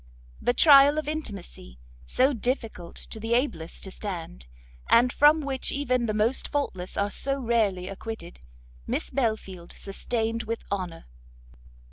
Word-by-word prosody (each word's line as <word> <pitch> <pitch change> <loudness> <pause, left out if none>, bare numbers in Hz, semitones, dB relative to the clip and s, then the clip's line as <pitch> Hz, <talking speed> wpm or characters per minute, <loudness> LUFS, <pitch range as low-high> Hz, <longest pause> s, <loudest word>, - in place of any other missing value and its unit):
The 245 - +1
trial 285 -1 +7
of 310 - -2
intimacy, 200 - -6 0.3
so 265 +3 +3
difficult 225 -7 -3
to 220 - -6
the 225 +2 0
ablest 175 - -2
to 190 - -5
stand, 170 - -6 0.4
and 245 +2 +5
from 300 +2 +5
which 275 -2 -1
even 255 -4 0
the 215 - 0
most 225 +5 +1
faultless 190 -11 -3
are 200 0 0
so 275 +4 -2
rarely 220 -7 +1
acquitted, 195 - -7 0.5
Miss - - -2
Belfield 215 -8 -2
sustained 225 +3 -2
with 225 +1 -5
honour. 180 -4 -4
225 Hz, 135 wpm, -26 LUFS, 195-265 Hz, 0.5 s, trial